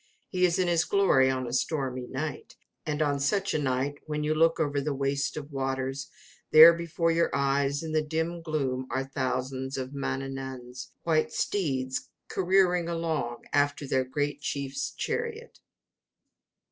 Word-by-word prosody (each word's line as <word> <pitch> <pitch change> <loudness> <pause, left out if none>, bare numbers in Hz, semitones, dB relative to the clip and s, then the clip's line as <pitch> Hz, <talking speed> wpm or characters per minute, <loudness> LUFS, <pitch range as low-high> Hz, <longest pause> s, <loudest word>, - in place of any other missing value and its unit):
He 185 -1 +2
is 175 0 +2
in 185 -1 +1
his 170 -1 +3
glory 165 -10 +4
on 130 -1 -1
a 120 - -5
stormy 130 -2 -1
night, 145 +1 -5 0.3
and 150 0 0
on 145 -1 0
such 195 +8 +1
a 155 - +1
night, 135 +1 -1
when 150 0 -2
you 155 +1 +1
look 165 +1 +3
over 145 -2 0
the 145 0 -2
waste 140 +1 -1
of 150 0 -7
waters, 135 0 -3 0.4
there 160 +2 +10
before 170 0 0
your 170 +1 +2
eyes, 140 +1 +1
in 160 - -4
the 155 0 +2
dim 160 +2 -2
gloom, 135 -5 -2
are 130 +2 -1
thousands 130 0 -3
of 130 +1 -4
Mannanan's 135 -2 -5
white 160 -2 +1
steeds 130 -9 -1 0.2
careering 180 -2 +2
along 160 -8 -2
after 145 0 +1
their 130 0 +2
great 145 +2 -2
chief's 140 -1 -3
chariot. 465 0 -4
145 Hz, 155 wpm, -28 LUFS, 135-165 Hz, 0.4 s, there